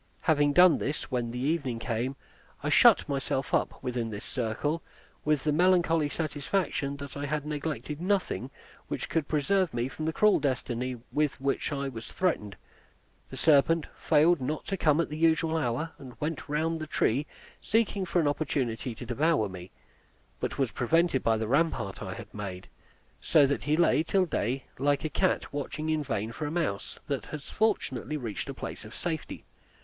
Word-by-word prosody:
Having 145 -2 +3
done 180 0 +7
this, 145 0 -3
when 120 -2 -1
the 120 - -5
evening 135 -2 0
came, 120 +3 -2 0.5
I - - 0
shut - - +6
myself 135 -1 -2
up - - 0
within 120 -3 -2
this 105 -2 -6
circle, 135 +7 -2 0.4
with 150 -3 +1
the 150 - +2
melancholy 165 -2 +3
satisfaction 145 -2 -1
that 140 -1 -8
I 145 0 -3
had 150 0 -2
neglected 150 0 -4
nothing 185 -9 0 0.4
which - - -3
could 160 -3 0
preserve 165 +1 +1
me 120 +1 0
from 155 +3 -5
the 160 - +1
cruel 210 +5 +4
destiny 130 -2 -2
with 150 -2 0
which 135 +3 -1
I 140 -1 -2
was 115 -4 -7
threatened. 110 - -1 0.7
The - - -8
serpent 155 +1 +4
failed 160 +1 +4
not 150 +4 -2
to 195 - 0
come 155 -4 +3
at 170 - +2
the 150 - -6
usual 165 0 +3
hour, 155 +2 -1
and 130 -3 -11
went 150 0 -3
round 160 +2 0
the 155 - -5
tree 140 0 +1 0.3
seeking 210 -3 +1
for 180 -1 +1
an 155 - +2
opportunity 130 -5 -1
to 120 - -8
devour 130 -1 +2
me, 90 -1 -9 0.7
but - - -3
was 135 -5 +1
prevented 165 +2 +2
by 115 -1 +2
the 110 0 -2
rampart 130 -7 0
I - - -5
had - - -10
made; 95 -3 -6 0.5
so 150 -3 +5
that 140 +1 0
he 150 +1 +2
lay 170 -3 +4
till 185 +3 +2
day, 130 - -1 0.2
like 145 +2 +1
a - - 0
cat 145 - 0
watching 150 +2 -3
in 155 -1 +1
vain 110 -4 -2
for 150 +5 -4
a - - -4
mouse 155 -13 -2
that 140 -3 -3
has 150 -2 -7
fortunately 155 - 0
reached 115 -7 -5
a - - -5
place - - -6
of - - -11
safety. - - -4
145 Hz, 180 wpm, -29 LUFS, 125-160 Hz, 0.7 s, done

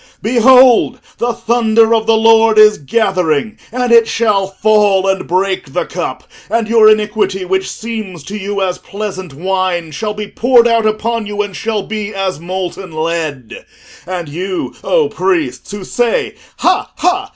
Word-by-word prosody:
Behold, 250 +2 +5 0.2
the 240 0 0
thunder 230 -1 +2
of 220 -1 0
the 225 0 +4
Lord 225 0 +4
is 215 -1 +6
gathering, 180 - -1
and 250 0 -1
it 230 -1 +6
shall 210 -5 +1
fall 200 -1 +2
and 190 0 -1
break 190 +1 -1
the - - -1
cup, - - -5 0.3
and 230 -2 0
your 220 -1 +5
iniquity, 210 -3 0
which 190 +1 -1
seems 215 -8 -6
to 200 - -7
you 200 -1 -3
as 180 -1 -2
pleasant 195 -4 -6
wine, 180 +1 -2
shall 210 +5 -4
be 210 0 -4
poured 240 +2 +3
out 230 -2 +2
upon 220 +1 -2
you, 210 0 -2
and 200 -2 -8
shall 220 -1 -2
be 215 0 -5
as 190 -4 -2
molten 185 +1 -5
lead. 155 -6 -4 0.4
And 180 -3 -4
you, 180 +5 -4
O 480 -3 +2
priests, 360 -6 -2
who 205 -1 -6
say, 235 +4 -1 0.2
Ha, - - +1
ha! 385 +2 0
210 Hz, 160 wpm, -14 LUFS, 185-225 Hz, 0.4 s, is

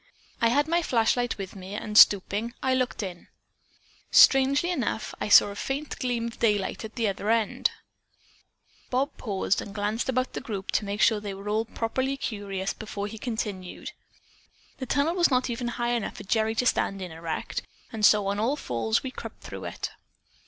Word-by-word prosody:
I 230 - +5
had 285 +6 +2
my 340 +2 +2
flashlight 245 -3 +1
with 195 -1 -7
me, 190 +1 -8
and 210 0 -5
stooping, 210 +3 +5
I 260 - +2
looked 255 -3 -1
in. 180 -3 -7 0.8
Strangely 275 +6 +6
enough, 250 -8 -2
I - - -1
saw 205 - +8
a 200 - -7
faint 275 +7 -4
gleam 245 -2 -1
of 235 - -7
daylight 210 -3 +1
at 220 0 -8
the 230 -3 +1
other 200 +1 -2
end." 225 -2 +2 1.2
Bob 270 +4 0
paused 200 -3 -1
and 200 - -9
glanced 210 +4 -1
about 255 0 0
the - - -4
group 205 -7 -5
to 210 - 0
make 205 +1 -3
sure 220 -2 +4
that 205 - -8
they 195 - -4
were 200 +2 -7
all 220 +2 +1
properly 260 +4 -2
curious 200 -6 -3
before 210 -2 -5
he 215 +1 -7
continued: 210 -6 -4 0.9
"The 260 - -4
tunnel 290 +6 +1
was 350 -1 +3
not 255 -2 +2
high 240 0 -2
enough 240 -3 -1
for - - -8
even 195 - -20
Gerry 220 0 +2
to 250 - +1
stand 195 -5 +1
in 185 -2 -6
erect 165 0 -4 0.3
and 220 -1 -4
so 210 -1 +6
on 200 +1 -1
all 240 +7 +1
fours 115 - -1
we 265 - -4
crept - - -9
through - - -7
it. - - -5
220 Hz, 190 wpm, -27 LUFS, 200-255 Hz, 1.2 s, saw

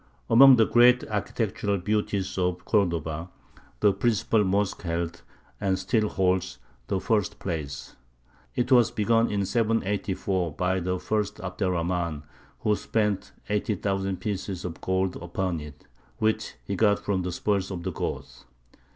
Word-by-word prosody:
] - - -37
Among 135 +3 +9
the 115 -2 +5
great 125 +2 +5
architectural 105 -1 -1
beauties 100 0 -1
of 90 -1 -1
Cordova, 85 -5 0 0.5
the 100 - +5
principal 110 +1 +2
mosque 100 +1 0
held, 85 -1 -3 0.4
and 95 -1 +1
still 105 +3 +1
holds, 95 -1 0 0.3
the 95 - 0
first 105 0 0
place. 75 -7 -5 0.6
It 125 +2 -1
was 120 -3 +6
begun 115 +2 +2
in 100 -1 0
784 100 -5 0
by 90 +4 0
the 90 +1 -1
first 105 +2 -2
Abd 90 +1 -7
er 95 - +3
Rahmān, 85 -3 -1 0.4
who 105 - +2
spent 105 -2 -1 0.2
80,000 100 -2 -1
pieces 95 -3 -4
of 85 -2 -6
gold 95 0 0
upon 90 0 -3
it, 75 -1 -11 0.3
which 110 0 0
he - - -2
got 105 -2 +3
from 100 -2 -1
the 90 0 -3
spoils 100 +1 -1
of 90 -3 -5
the - - -2
Goths. - - -5
95 Hz, 145 wpm, -26 LUFS, 90-105 Hz, 0.6 s, Among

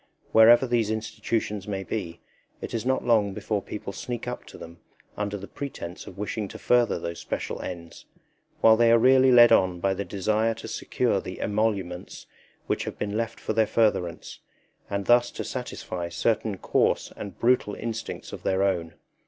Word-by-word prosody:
Wherever 115 +3 +7
these 120 -4 +1
institutions 110 -2 -3
may 95 -2 -3
be, 90 -5 -5 0.4
it - - -7
is 115 +1 -2
not 130 0 +1
long 105 -5 +2
before 105 0 -2
people 100 0 -7
sneak 120 +2 -5
up 125 - -5
to - - -12
them 85 0 -11 0.4
under 105 0 -3
the 100 0 -9
pretence 90 -11 -7
of 95 - -11
wishing 105 +1 -3
to - - -9
further 120 -1 +2
those 85 0 -5
special - - -4
ends, 85 -2 -8 0.6
while 110 0 +7
they 115 0 +4
are 115 - +7
really 130 +2 +5
led 120 -1 +8
on 90 -2 +3
by 95 +2 +1
the 100 - -3
desire 110 +4 0
to 110 - -9
secure - - -1
the - - -8
emoluments 100 -4 -2 0.4
which - - -1
have - - -6
been 105 0 -3
left 115 +1 -2
for - - -3
their 110 0 +3
furtherance, 105 -6 0 0.5
and 100 -1 -2
thus 120 0 +4
to - - -6
satisfy 90 -8 -5
certain 110 +1 0
coarse - - 0
and 100 - -8
brutal 120 -4 +2
instincts 115 -1 -6
of - - -7
their 95 +1 +1
own. 85 -4 -1
105 Hz, 175 wpm, -26 LUFS, 95-115 Hz, 0.6 s, led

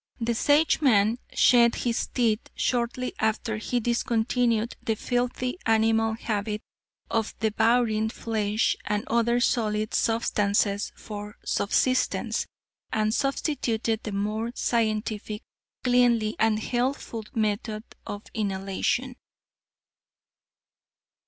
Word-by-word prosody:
The 235 0 0
Sageman 245 -5 +3 0.2
shed 235 -1 +5
his 235 -1 -1
teeth 230 -3 0
shortly 245 +1 -1
after 220 0 0
he 245 +3 -1
discontinued 235 0 +1
the 225 - 0
filthy 250 - -2
animal 225 0 +3
habit 210 -2 -3 0.5
of 225 -1 -1
devouring 220 0 +2
flesh 220 -1 0
and 210 0 -1
other 235 +1 +2
solid 215 -3 0
substances 205 -2 +1
for 210 -1 -8
subsistence, 255 +5 +1 0.4
and 215 0 +1
substituted 235 -5 0
the 215 - -5
more 210 +3 -2
scientific, 215 -2 -1 0.4
cleanly 240 -3 +3
and 220 -1 +3
healthful 240 0 -2
method 215 0 -1 0.2
of 205 +1 -5
inhalation." 200 +5 -1
225 Hz, 95 wpm, -26 LUFS, 215-240 Hz, 0.5 s, shed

